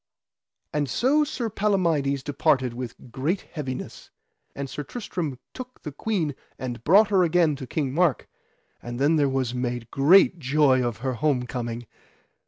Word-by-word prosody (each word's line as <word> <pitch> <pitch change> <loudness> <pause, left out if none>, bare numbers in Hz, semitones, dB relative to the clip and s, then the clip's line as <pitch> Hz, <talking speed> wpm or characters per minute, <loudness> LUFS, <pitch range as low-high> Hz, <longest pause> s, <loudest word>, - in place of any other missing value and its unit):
And 145 -2 0
so 280 - +3
Sir 265 -5 -3
Palamides 170 -10 +1
departed 140 -3 +1
with 120 0 -8
great 150 - -1
heaviness. 135 -6 -7 0.5
And 140 0 -4
Sir 135 +3 -5
Tristram 160 - -4 0.2
took 255 0 -10
the 150 - -5
queen 165 -1 -1 0.2
and 120 -3 -5
brought 200 - +6
her 195 -3 +4
again 165 -3 +3
to 130 -2 -7
King 140 -3 -2
Mark, 165 -4 +1 0.5
and 120 0 -6
then 145 -1 +3
was 130 -3 0
there 125 - -3
made 120 -2 -3
great 175 +5 +5
joy 135 -2 +3
of 120 -2 -2
her 130 - 0
home 125 0 0
coming. 120 -1 -4
145 Hz, 155 wpm, -25 LUFS, 130-175 Hz, 0.5 s, brought